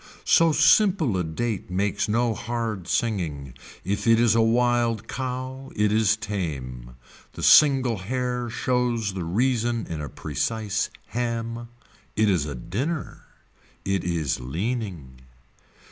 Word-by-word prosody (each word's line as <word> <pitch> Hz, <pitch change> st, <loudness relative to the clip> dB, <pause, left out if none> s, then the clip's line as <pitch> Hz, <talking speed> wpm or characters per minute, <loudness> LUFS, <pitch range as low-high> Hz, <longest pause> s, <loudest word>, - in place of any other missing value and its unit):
So 165 Hz, -1 st, +5 dB
simple 160 Hz, -, +4 dB
a 90 Hz, -, 0 dB
date 95 Hz, +6 st, -3 dB
makes 100 Hz, +3 st, -1 dB
no 115 Hz, +1 st, +2 dB
hard 115 Hz, -4 st, -4 dB
singing. 80 Hz, -, -2 dB, 0.3 s
If 100 Hz, +4 st, -2 dB
it 115 Hz, 0 st, +5 dB
is 115 Hz, -3 st, +4 dB
a 115 Hz, -, +4 dB
wild 115 Hz, -1 st, +2 dB
cow 130 Hz, +1 st, -5 dB
it 105 Hz, 0 st, +2 dB
is 110 Hz, 0 st, +3 dB
tame. 70 Hz, -, -5 dB, 0.4 s
The -, -, -7 dB
single 135 Hz, -6 st, +6 dB
hair 125 Hz, +3 st, -2 dB
shows 120 Hz, -4 st, 0 dB
the 95 Hz, -2 st, -4 dB
reason 115 Hz, +4 st, 0 dB
in 80 Hz, -2 st, -5 dB
a 75 Hz, -, -5 dB
precise 105 Hz, -, -2 dB, 0.2 s
ham. 115 Hz, 0 st, -3 dB, 0.5 s
It 110 Hz, -1 st, +3 dB
is 80 Hz, -6 st, 0 dB
a 70 Hz, -, -5 dB
dinner. 135 Hz, -, -4 dB, 0.6 s
It 95 Hz, -1 st, 0 dB
is 80 Hz, -7 st, -1 dB
leaning. 80 Hz, -, -4 dB
110 Hz, 130 wpm, -25 LUFS, 90-120 Hz, 0.6 s, single